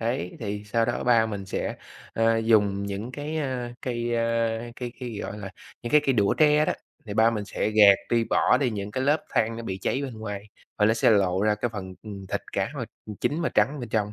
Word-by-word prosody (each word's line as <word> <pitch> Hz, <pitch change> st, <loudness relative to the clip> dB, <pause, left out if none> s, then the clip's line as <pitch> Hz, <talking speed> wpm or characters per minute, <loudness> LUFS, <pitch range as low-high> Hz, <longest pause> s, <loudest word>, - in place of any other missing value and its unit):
Đấy, 115 Hz, -6 st, -2 dB
thì 105 Hz, -1 st, -4 dB
sau 115 Hz, +2 st, +1 dB
đó -, -, -2 dB
ba 115 Hz, -2 st, +4 dB
mình 100 Hz, -3 st, -5 dB
sẽ, 95 Hz, -, -3 dB, 0.4 s
a, 115 Hz, 0 st, +3 dB
dùng 105 Hz, -3 st, +2 dB
những 100 Hz, +5 st, -5 dB
cái, 150 Hz, +3 st, -4 dB
a, 125 Hz, -4 st, -3 dB
cây, 120 Hz, -1 st, -2 dB
ơ, 115 Hz, -, +1 dB, 0.6 s
cây 120 Hz, -1 st, -4 dB
cây, 120 Hz, -4 st, -5 dB
gọi 105 Hz, -, -6 dB
là, 100 Hz, -2 st, -6 dB, 0.3 s
những 120 Hz, -, -4 dB
cái 150 Hz, -, +7 dB
cây 135 Hz, -, +4 dB
đũa 100 Hz, -5 st, +2 dB
tre 150 Hz, 0 st, +4 dB
đó, -, -, +1 dB, 0.3 s
thì 105 Hz, -, -5 dB
ba 110 Hz, +1 st, +5 dB
mình 105 Hz, -3 st, -3 dB
sẽ 105 Hz, -, -2 dB
gạt 105 Hz, -2 st, +8 dB, 0.2 s
đi, 115 Hz, -1 st, +3 dB
bỏ -, -, +3 dB
đi 130 Hz, -4 st, +1 dB
những 100 Hz, -1 st, -4 dB
cái 130 Hz, +5 st, -2 dB
lớp 150 Hz, +3 st, +2 dB
than 115 Hz, +1 st, +1 dB
nó 115 Hz, -, -6 dB
bị 95 Hz, -4 st, -4 dB
cháy 135 Hz, -, 0 dB
bên 130 Hz, -4 st, -5 dB
ngoài, 105 Hz, -2 st, -6 dB, 0.3 s
và 105 Hz, -, +4 dB
nó 110 Hz, -, +4 dB
sẽ 115 Hz, -, +4 dB
lộ 95 Hz, -2 st, +3 dB
ra 105 Hz, 0 st, +3 dB
cái 105 Hz, +3 st, -2 dB
phần, 95 Hz, -2 st, -6 dB
ừ, 110 Hz, -, -9 dB, 0.2 s
thịt -, -, -1 dB
cá -, -, 0 dB
mà -, -, -2 dB, 0.4 s
chín 150 Hz, +3 st, 0 dB
mà -, -, +1 dB
trắng 145 Hz, +1 st, +1 dB
bên 120 Hz, -, -6 dB
trong. 105 Hz, -1 st, -1 dB
115 Hz, 240 wpm, -26 LUFS, 105-120 Hz, 0.6 s, gạt